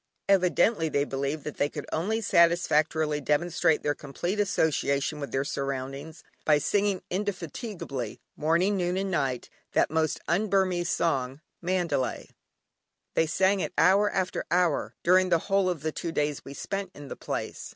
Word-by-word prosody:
Evidently 185 Hz, -1 st, +3 dB
they 140 Hz, -1 st, +1 dB
believed 140 Hz, +1 st, -3 dB
that 150 Hz, -, -6 dB
they 145 Hz, -, +1 dB
could 150 Hz, -2 st, -6 dB
only 215 Hz, +8 st, 0 dB
satisfactorily 160 Hz, -5 st, +3 dB
demonstrate 160 Hz, +2 st, +1 dB
their 145 Hz, -, +1 dB
complete 175 Hz, +9 st, -4 dB
association 150 Hz, -6 st, +1 dB
with 140 Hz, -, -5 dB
their 135 Hz, +1 st, 0 dB
surroundings, 140 Hz, +3 st, -4 dB, 0.2 s
by 150 Hz, -1 st, +4 dB
singing 200 Hz, +5 st, 0 dB
indefatigably, 180 Hz, -, -4 dB, 0.2 s
morning, 170 Hz, +6 st, +2 dB
noon, 180 Hz, -1 st, 0 dB
and 195 Hz, 0 st, -1 dB
night, 135 Hz, -8 st, -1 dB, 0.3 s
that -, -, +2 dB
most 160 Hz, 0 st, 0 dB
un 200 Hz, +6 st, +1 dB
Burmese 185 Hz, -3 st, +1 dB
song, 135 Hz, -5 st, 0 dB, 0.2 s
"Mandalay." 175 Hz, -7 st, -1 dB, 0.8 s
They 160 Hz, -, +2 dB
sang 190 Hz, +5 st, +2 dB
it -, -, -3 dB
hour 195 Hz, +5 st, +5 dB
after 185 Hz, -2 st, -1 dB
hour, 175 Hz, -2 st, +1 dB
during 185 Hz, +1 st, +4 dB
the 170 Hz, -, +4 dB
whole 195 Hz, +2 st, +1 dB
of 165 Hz, -5 st, -3 dB
the 160 Hz, -, -1 dB
two 170 Hz, +2 st, -4 dB
days 150 Hz, -2 st, -1 dB
we 140 Hz, -, -9 dB
spent 195 Hz, +3 st, -4 dB
in 145 Hz, -1 st, -10 dB
the -, -, -6 dB
place. -, -, -5 dB
165 Hz, 155 wpm, -27 LUFS, 145-185 Hz, 0.8 s, hour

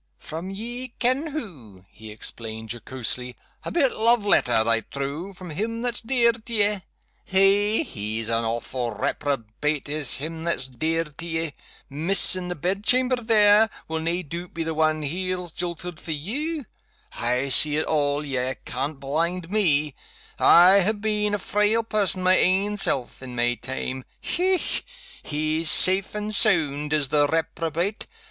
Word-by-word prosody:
"From 165 Hz, +4 st, -7 dB
ye 240 Hz, +5 st, -6 dB
ken 255 Hz, +6 st, +2 dB
who," 145 Hz, -, -8 dB
he 110 Hz, 0 st, -12 dB
explained, 110 Hz, +1 st, -7 dB
jocosely. 125 Hz, +1 st, -3 dB, 0.3 s
"A -, -, -4 dB
bit 280 Hz, -7 st, +2 dB
love 230 Hz, -1 st, +3 dB
letter, 120 Hz, -, +5 dB
I 115 Hz, 0 st, +4 dB
trow, 140 Hz, -, -6 dB
from 180 Hz, -2 st, -10 dB
him 230 Hz, +8 st, -3 dB
that's 245 Hz, -1 st, -1 dB
dear 235 Hz, -1 st, +3 dB
to 230 Hz, 0 st, -12 dB
ye. 210 Hz, -2 st, +2 dB, 0.5 s
Eh! 200 Hz, +6 st, +4 dB
he's 110 Hz, -, -3 dB
an 115 Hz, 0 st, +1 dB
awfu' 115 Hz, 0 st, -3 dB
reprobate 145 Hz, +2 st, -2 dB
is 145 Hz, -3 st, -1 dB
him 160 Hz, +4 st, -6 dB
that's 170 Hz, -6 st, -1 dB
dear 160 Hz, +6 st, -1 dB
to 150 Hz, 0 st, -11 dB
ye. 160 Hz, -2 st, -3 dB, 0.3 s
Miss, 170 Hz, +8 st, +4 dB
in 185 Hz, -1 st, -4 dB
the 180 Hz, -, -3 dB
bedchamber 215 Hz, -, +1 dB
there, 220 Hz, -2 st, +4 dB, 0.2 s
will 160 Hz, 0 st, -3 dB
nae 170 Hz, +3 st, -2 dB
doot 170 Hz, +3 st, -8 dB
be 165 Hz, -, -1 dB
the 160 Hz, 0 st, -2 dB
one 155 Hz, 0 st, +1 dB
he's 180 Hz, +3 st, -3 dB
jilted 175 Hz, 0 st, -5 dB
for 165 Hz, -, -4 dB
you? 280 Hz, -, -4 dB, 0.5 s
I 125 Hz, +3 st, -1 dB
see 150 Hz, +3 st, +2 dB
it 155 Hz, -, 0 dB
all 145 Hz, -1 st, 0 dB
ye 130 Hz, -2 st, -2 dB
can't 135 Hz, +3 st, -3 dB
blind 165 Hz, +6 st, -2 dB
Me 155 Hz, -9 st, +2 dB, 0.5 s
I 185 Hz, +3 st, +7 dB
ha' 210 Hz, +3 st, 0 dB
been 210 Hz, -1 st, 0 dB
a -, -, -1 dB
frail 210 Hz, +3 st, +1 dB
person 200 Hz, -4 st, +1 dB
my 185 Hz, 0 st, +5 dB
ain 195 Hz, +3 st, +2 dB
self, 130 Hz, -11 st, 0 dB
in 125 Hz, -2 st, -8 dB
my 120 Hz, 0 st, +1 dB
time. 130 Hz, +1 st, -5 dB
Hech! 370 Hz, +1 st, 0 dB, 0.4 s
he's 155 Hz, +2 st, -2 dB
safe 190 Hz, +5 st, +4 dB
and 210 Hz, 0 st, -4 dB
sound, 150 Hz, -9 st, +1 dB
is 150 Hz, -3 st, 0 dB
the 145 Hz, 0 st, +3 dB
reprobate. 165 Hz, +5 st, -2 dB
165 Hz, 155 wpm, -24 LUFS, 140-205 Hz, 0.5 s, I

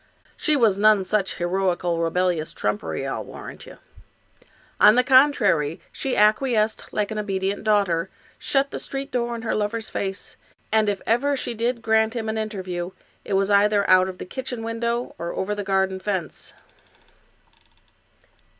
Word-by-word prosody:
She 305 Hz, -, +2 dB
was 220 Hz, -7 st, +3 dB
none 215 Hz, -2 st, +5 dB
such 195 Hz, +1 st, -1 dB
heroical, 175 Hz, -1 st, 0 dB
rebellious 170 Hz, -1 st, 0 dB
trumpery, 105 Hz, -7 st, -2 dB
I'll -, -, -3 dB
warrant -, -, -10 dB
ye. -, -, -11 dB, 1.0 s
On 210 Hz, +1 st, +7 dB
the 250 Hz, -, +4 dB
con 265 Hz, +3 st, +6 dB
trary, 165 Hz, -, 0 dB
she 270 Hz, -, -2 dB
acquiesced 215 Hz, 0 st, +2 dB
like 210 Hz, 0 st, -1 dB
an 215 Hz, -, -3 dB
obedient 195 Hz, -1 st, -2 dB
daughter, 200 Hz, -6 st, +1 dB, 0.3 s
shut 275 Hz, 0 st, +1 dB
the -, -, -4 dB
street 275 Hz, +1 st, -5 dB
door 240 Hz, -1 st, -1 dB
in 230 Hz, -, -7 dB
her 225 Hz, -, -1 dB
lover's 215 Hz, +1 st, -2 dB
face, 195 Hz, 0 st, -4 dB, 0.3 s
and 215 Hz, -1 st, +3 dB
if 200 Hz, -1 st, -3 dB
ever 275 Hz, +5 st, +1 dB
she 245 Hz, -, -3 dB
did 235 Hz, +1 st, -2 dB
grant 220 Hz, +1 st, +2 dB
him 220 Hz, -2 st, -3 dB
an 220 Hz, -, -2 dB
interview, 185 Hz, -5 st, -4 dB, 0.3 s
it 205 Hz, -, -4 dB
was 195 Hz, +1 st, +2 dB
either 205 Hz, 0 st, +3 dB
out 185 Hz, 0 st, +5 dB
of 185 Hz, -, -8 dB
the -, -, -7 dB
kitchen 250 Hz, +2 st, -5 dB
window 235 Hz, +1 st, -2 dB
or 170 Hz, +1 st, -4 dB
over 200 Hz, +2 st, -2 dB
the 205 Hz, 0 st, -4 dB
garden 190 Hz, -1 st, 0 dB
fence. 190 Hz, -4 st, -4 dB
210 Hz, 160 wpm, -23 LUFS, 190-230 Hz, 1.0 s, On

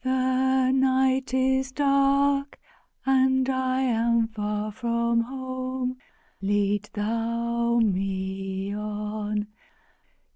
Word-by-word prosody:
The 260 Hz, 0 st, +2 dB
night 265 Hz, -1 st, +2 dB
is 265 Hz, 0 st, +1 dB
dark 275 Hz, 0 st, +2 dB, 0.5 s
and 260 Hz, -1 st, +3 dB
I 260 Hz, 0 st, 0 dB
am 230 Hz, -2 st, +2 dB
far 210 Hz, -1 st, -3 dB
from 235 Hz, +1 st, 0 dB
home! 255 Hz, 0 st, -4 dB, 0.4 s
Lead 205 Hz, +1 st, 0 dB
Thou 235 Hz, +2 st, -1 dB
me 190 Hz, 0 st, -2 dB
on! 210 Hz, 0 st, -3 dB
235 Hz, 80 wpm, -26 LUFS, 210-260 Hz, 0.5 s, and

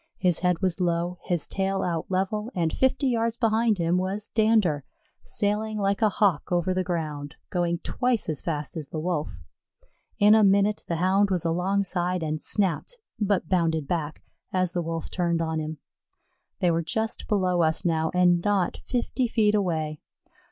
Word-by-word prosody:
His 180 Hz, -3 st, +2 dB
head 180 Hz, +1 st, 0 dB
was 185 Hz, 0 st, +1 dB
low, 175 Hz, 0 st, 0 dB
his 175 Hz, -4 st, 0 dB
tail 195 Hz, 0 st, -1 dB
out 170 Hz, -2 st, -2 dB
level, 195 Hz, +4 st, -1 dB
and 165 Hz, -3 st, 0 dB
fifty 265 Hz, +2 st, +1 dB
yards 230 Hz, -2 st, 0 dB
behind 225 Hz, -1 st, +2 dB
him 170 Hz, +1 st, +1 dB
was 195 Hz, +3 st, -3 dB
Dander, 215 Hz, -, +2 dB, 0.4 s
sailing 215 Hz, +1 st, -1 dB
like 200 Hz, 0 st, 0 dB
a 215 Hz, -, +5 dB
Hawk 200 Hz, -9 st, +1 dB
over 175 Hz, +1 st, +1 dB
the 185 Hz, 0 st, 0 dB
ground, 155 Hz, -5 st, -4 dB, 0.2 s
going 175 Hz, -1 st, 0 dB
twice 250 Hz, -3 st, 0 dB
as 155 Hz, -3 st, -2 dB
fast 150 Hz, -2 st, -3 dB
as 155 Hz, -4 st, -6 dB
the 155 Hz, -, -4 dB
Wolf. 150 Hz, -, -3 dB, 0.7 s
In 210 Hz, +1 st, +6 dB
a 220 Hz, -1 st, +6 dB
minute 200 Hz, +1 st, +3 dB
the 170 Hz, -, -1 dB
Hound 190 Hz, +4 st, +2 dB
was 180 Hz, -3 st, -1 dB
alongside 180 Hz, 0 st, 0 dB
and 155 Hz, -1 st, -2 dB
snapped, 195 Hz, -, 0 dB, 0.2 s
but 200 Hz, -5 st, +1 dB
bounded 160 Hz, -5 st, +1 dB
back, 155 Hz, -2 st, -3 dB, 0.3 s
as 185 Hz, -2 st, 0 dB
the 175 Hz, -, 0 dB
Wolf 165 Hz, 0 st, -4 dB
turned 170 Hz, -2 st, 0 dB
on 160 Hz, -1 st, -1 dB
him. 155 Hz, 0 st, -4 dB, 0.8 s
They 175 Hz, -, +3 dB
were 165 Hz, 0 st, +1 dB
just 220 Hz, +8 st, -3 dB
below 185 Hz, -4 st, +1 dB
us 160 Hz, +1 st, +1 dB
now 160 Hz, -1 st, +1 dB
and 180 Hz, -1 st, +3 dB
not 200 Hz, -4 st, +1 dB
fifty 245 Hz, +1 st, -1 dB
feet 215 Hz, -2 st, +2 dB
away. 160 Hz, -7 st, -1 dB
180 Hz, 170 wpm, -26 LUFS, 165-205 Hz, 0.8 s, In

